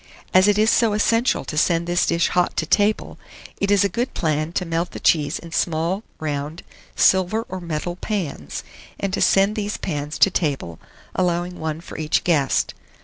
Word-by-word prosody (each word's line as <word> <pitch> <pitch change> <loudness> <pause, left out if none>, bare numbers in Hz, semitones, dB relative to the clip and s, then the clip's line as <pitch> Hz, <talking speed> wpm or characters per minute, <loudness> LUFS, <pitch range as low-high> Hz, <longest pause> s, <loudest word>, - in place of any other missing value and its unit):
As 185 +2 +6
it 205 0 +3
is 215 +1 +4
so 225 -3 +3
essential 230 +3 +2
to - - -5
send 165 +2 +2
this 175 0 +1
dish 170 0 +2
hot 180 0 0
to 160 - +1
table, 205 +5 +1 0.4
it 200 - 0
is 200 -1 +4
a - - +3
good 235 +7 -3
plan 155 -1 0
to 180 - -1
melt 165 +1 -2
the - - -6
cheese 150 -1 +2
in 170 - -11
small 170 +3 0 0.2
round 150 +1 -4 0.3
silver 190 +4 +3
or 185 0 -6
metal 170 +1 -4
pans, 170 - -4 0.4
and 195 -1 -2
to - - -1
send 195 +2 +4
these 210 -1 -2
pans 150 -2 -4
to 195 - +5
table, 140 - -2 0.3
allowing 180 0 -1
one 160 0 -3
for - - -9
each 155 -1 +1
guest. 145 -7 +1
175 Hz, 185 wpm, -22 LUFS, 155-200 Hz, 0.4 s, As